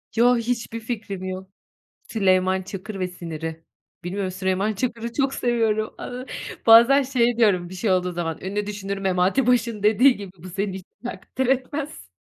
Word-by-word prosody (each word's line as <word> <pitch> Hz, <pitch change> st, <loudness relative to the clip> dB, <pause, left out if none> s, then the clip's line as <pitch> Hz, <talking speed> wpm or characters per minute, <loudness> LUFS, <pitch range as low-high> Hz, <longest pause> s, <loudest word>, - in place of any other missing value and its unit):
Yo, 245 Hz, +1 st, +5 dB
hiçbir 230 Hz, -1 st, -2 dB
fikrim 215 Hz, -5 st, -5 dB
yok. 185 Hz, 0 st, -5 dB, 0.6 s
Süleyman 190 Hz, -3 st, +2 dB
Çakır 195 Hz, +1 st, -7 dB
ve 185 Hz, -, 0 dB
siniri. 165 Hz, -2 st, -6 dB, 0.4 s
Bilmiyorum 190 Hz, +1 st, -3 dB
Süleyman 190 Hz, +3 st, 0 dB
Çakır'ı 235 Hz, +1 st, -3 dB
çok 270 Hz, -1 st, +1 dB
seviyorum. 225 Hz, -3 st, 0 dB
Iıı, 250 Hz, +1 st, -6 dB, 0.4 s
bazen 235 Hz, +5 st, +8 dB
şey 245 Hz, -3 st, +1 dB
diyorum, 185 Hz, -6 st, +3 dB
bir -, -, -9 dB
şey 195 Hz, +1 st, 0 dB
olduğu 180 Hz, -1 st, +1 dB
zaman, 165 Hz, -2 st, -3 dB
ünlü 200 Hz, +2 st, -2 dB
düşünür 200 Hz, -1 st, -4 dB
Memati 195 Hz, +6 st, +1 dB
Baş'ın 230 Hz, -4 st, +1 dB
dediği 240 Hz, +5 st, +5 dB
gibi, 200 Hz, -3 st, -8 dB
"Bu 185 Hz, -, -8 dB
seni 195 Hz, +1 st, -2 dB
hiç 190 Hz, -1 st, -8 dB, 0.2 s
takdir 255 Hz, +1 st, -3 dB
etmez." 270 Hz, -, -2 dB
205 Hz, 155 wpm, -23 LUFS, 185-235 Hz, 0.6 s, bazen